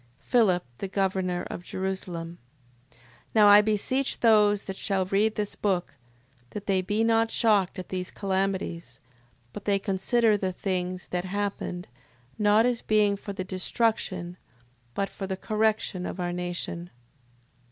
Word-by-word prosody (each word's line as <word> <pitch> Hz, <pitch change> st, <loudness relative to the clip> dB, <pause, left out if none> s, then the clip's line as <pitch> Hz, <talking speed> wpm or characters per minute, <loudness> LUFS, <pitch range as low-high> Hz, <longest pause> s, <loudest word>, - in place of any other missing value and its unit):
Philip... 190 Hz, -, +2 dB
The 195 Hz, -, -3 dB
governor 190 Hz, -2 st, -1 dB
of -, -, -5 dB
Jerusalem. 175 Hz, -2 st, -4 dB, 0.5 s
6:12. -, -, -25 dB, 0.4 s
Now 210 Hz, -2 st, +7 dB
I 205 Hz, +1 st, +9 dB
beseech 220 Hz, +6 st, 0 dB
those 210 Hz, -3 st, +5 dB
that 195 Hz, -, -6 dB
shall 195 Hz, -1 st, 0 dB
read 205 Hz, +3 st, +1 dB
this 210 Hz, -1 st, -3 dB
book, 190 Hz, -4 st, -1 dB, 0.6 s
that 205 Hz, +6 st, -7 dB
they 195 Hz, -2 st, +2 dB
be 210 Hz, +4 st, 0 dB
not 225 Hz, 0 st, +3 dB
shocked 205 Hz, -6 st, +2 dB
at 185 Hz, -, -7 dB
these 185 Hz, -1 st, -3 dB
calamities, 190 Hz, -, -2 dB, 0.5 s
but 205 Hz, -, -7 dB
that 205 Hz, -, +1 dB
they 200 Hz, -, +4 dB
consider 210 Hz, +3 st, +2 dB
the 190 Hz, -2 st, -1 dB
things 185 Hz, -1 st, -3 dB
that 180 Hz, 0 st, -2 dB
happened, 195 Hz, -2 st, -3 dB, 0.5 s
not 210 Hz, +2 st, +5 dB
as 245 Hz, -2 st, +1 dB
being 210 Hz, -2 st, +3 dB
for 200 Hz, 0 st, -7 dB
the 190 Hz, -, -4 dB
destruction, 185 Hz, -2 st, -1 dB, 0.6 s
but 200 Hz, -, 0 dB
for 195 Hz, -, -6 dB
the 190 Hz, 0 st, -3 dB
correction 215 Hz, -3 st, 0 dB
of -, -, -6 dB
our 175 Hz, 0 st, -2 dB
nation. 175 Hz, -1 st, -4 dB
195 Hz, 150 wpm, -27 LUFS, 185-210 Hz, 0.6 s, I